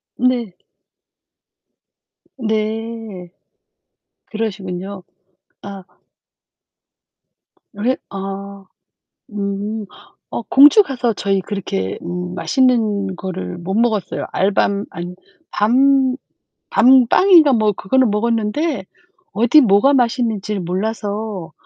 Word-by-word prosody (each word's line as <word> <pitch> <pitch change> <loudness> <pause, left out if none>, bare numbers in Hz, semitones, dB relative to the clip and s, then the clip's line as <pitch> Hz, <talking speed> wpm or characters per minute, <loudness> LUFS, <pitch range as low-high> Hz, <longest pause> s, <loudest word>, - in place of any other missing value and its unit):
네. 245 -6 0 1.8
네. 220 -4 -4 1.0
그러시군요. 195 -3 -5 0.6
아 195 -2 -9 1.9
왜 235 +6 -1
아. 195 0 -7 0.7
음. 205 +1 -4 0.4
어 - - -4
공주가서 270 - +4
저희 195 -1 -1
그렇게 175 - -4
음 180 0 -5
맛있는 215 -6 +1
거를 185 -1 -6
못 190 +3 -4
먹었어요. 220 -3 0
알밤 200 +1 +1
아니 175 +2 -7 0.4
밤 260 +4 +3 0.5
밤빵인가 275 +6 +5
뭐 215 -3 +2
그거는 230 +4 +1
먹었는데 230 - -1 0.5
어디 240 +8 +5
뭐가 235 +5 +4
맛있는지를 225 -5 0
몰라서 205 0 -4
210 Hz, 170 characters per minute, -18 LUFS, 195-240 Hz, 1.9 s, 밤빵인가